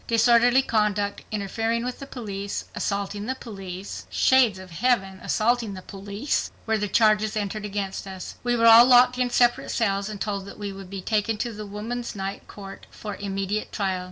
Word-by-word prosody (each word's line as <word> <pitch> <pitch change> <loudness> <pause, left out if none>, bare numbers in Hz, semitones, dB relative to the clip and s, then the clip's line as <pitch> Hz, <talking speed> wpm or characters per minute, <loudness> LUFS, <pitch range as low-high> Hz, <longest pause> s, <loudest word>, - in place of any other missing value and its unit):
Disorderly 240 +3 +5
conduct, 210 -3 0
interfering 225 +3 -1
with 250 0 -4
the 275 - -8
police, 200 -6 -5
assaulting 200 +1 -3
the 260 - -1
police 195 -5 -8
(Shades 255 -7 +4
of 185 -1 -11
Heaven! 195 -1 0
assaulting 230 -2 0
the 185 - -9
police!), 200 +6 -3 0.2
were 220 -1 +1
the 210 - -1
charges 215 +1 +3
entered 210 0 -3
against 200 -1 -4
us. 190 -1 -7
We 245 0 +1
were 230 -1 +2
all 230 +2 +9
locked 250 0 +6
in 250 -1 +2
separate 240 0 +2
cells 200 -3 0
and 210 -2 -6
told 200 -2 -3
that - - -10
we 205 -1 -5
would 195 -1 -10
be 195 0 -6
taken 215 +1 0
to 235 - -5
the 210 0 -7
Woman's 230 +4 -5
Night 195 0 -5
Court 195 -1 -10
for 210 -2 -7
immediate 200 +1 -3
trial. 190 -3 -1
210 Hz, 185 wpm, -25 LUFS, 195-235 Hz, 0.2 s, all